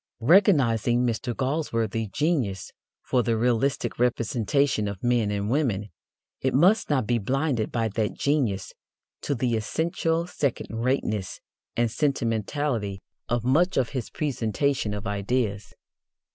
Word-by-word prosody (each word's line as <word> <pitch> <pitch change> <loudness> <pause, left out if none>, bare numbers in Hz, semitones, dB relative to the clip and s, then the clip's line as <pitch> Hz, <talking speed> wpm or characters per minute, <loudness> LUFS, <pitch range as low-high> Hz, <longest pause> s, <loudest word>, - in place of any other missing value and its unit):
Recognizing 125 - +4
Mr. 120 0 -2
Galsworthy's 115 -6 -1
genius 125 - -1 0.3
for 125 - +1
the 115 -1 0
realistic 120 +3 0
representation 120 0 +1
of 100 -2 -6
men 120 -3 +2
and 100 0 -2
women, 110 -6 0 0.5
it 130 -1 0
must 185 +10 +4
not 135 -6 +2
be 120 +1 +1
blinded 130 +1 -1
by 115 -2 0
that 105 0 -1
genius 125 -10 0 0.5
to 145 - -1
the 120 -1 0
essential 165 +8 -1
second 145 -7 -2
rateness 115 -5 -1 0.4
and 120 -1 +2
sentimentality 115 -5 -1 0.3
of 120 -1 0
much 165 +9 +2
of 130 -3 +2
his 130 -4 -4
presentation 135 -4 -1
of 105 - -6
ideas. 105 +1 -1
120 Hz, 125 wpm, -26 LUFS, 110-140 Hz, 0.5 s, Recognizing